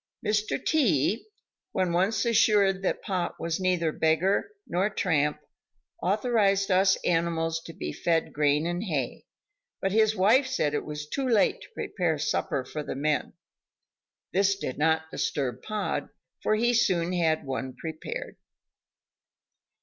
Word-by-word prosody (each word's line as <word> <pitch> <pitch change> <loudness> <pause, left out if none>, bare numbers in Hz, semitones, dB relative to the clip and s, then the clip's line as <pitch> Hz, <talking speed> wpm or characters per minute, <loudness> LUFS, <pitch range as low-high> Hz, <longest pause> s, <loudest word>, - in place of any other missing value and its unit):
Mr. 210 +3 0
T, 230 - +2 0.5
when 185 -2 +1
once 190 +8 +1
assured 205 -4 +3
that 195 - -1
Pod 185 -3 -2
was 165 +1 -2
neither 180 -3 +1
beggar 160 - +1 0.2
nor 185 +4 0
tramp, 150 -7 0 0.6
authorized 200 0 +2
us 190 +1 +5
animals 165 -1 0
to - - -7
be 75 - -5
fed 165 -2 0
grain 150 +1 +2
and 175 +4 -2
hay; 145 - -3 0.5
but 195 - -1
his 220 +1 +3
wife 225 +8 +4
said 155 - 0
it - - -2
was 150 0 -6
too 270 - -2
late 225 -5 +3
to - - -11
prepare 175 -5 -1
supper 140 -3 -1
for 150 - -5
the 145 - -5
men. 150 +2 -1 1.0
This 195 +1 +3
did 140 -9 -5
not 160 +1 +1
disturb 130 -4 -2
Pod 215 -1 -3 0.3
for 215 - +2
he 240 +3 +2
soon 185 -7 +2
had 160 -4 +1
one 130 -1 -4
prepared. 465 - -6
180 Hz, 140 wpm, -27 LUFS, 155-210 Hz, 1.0 s, us